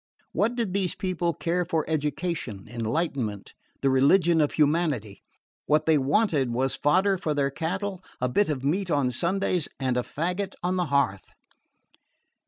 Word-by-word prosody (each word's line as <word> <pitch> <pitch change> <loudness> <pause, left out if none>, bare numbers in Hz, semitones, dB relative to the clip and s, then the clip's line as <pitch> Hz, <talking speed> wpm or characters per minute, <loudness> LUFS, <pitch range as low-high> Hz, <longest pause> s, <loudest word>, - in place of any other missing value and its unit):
What 230 +4 +1
did 230 -6 -2
these 195 -3 0
people 180 -2 -1
care 175 +3 0
for 165 -2 -1
education, 150 - -3
enlightenment, 115 - -2 0.3
the 135 - +4
religion 160 +5 +4
of 150 - +1
humanity? 150 - +1 0.5
What 155 +1 +3
they 160 -2 +4
wanted 145 - +2
was 130 +2 0
fodder 185 +6 +2
for 155 -5 -1
their 140 -1 +1
cattle, 185 +5 -3 0.2
a 125 - +1
bit 200 +11 +2
of 135 -4 -2
meat 180 +7 0
on 140 -5 +1
Sundays 180 +3 0
and 130 -2 0
a - - +2
faggot 180 +9 -3
on 180 +1 0
the 180 -1 +1
hearth. 140 - +1
155 Hz, 155 wpm, -26 LUFS, 135-180 Hz, 0.5 s, the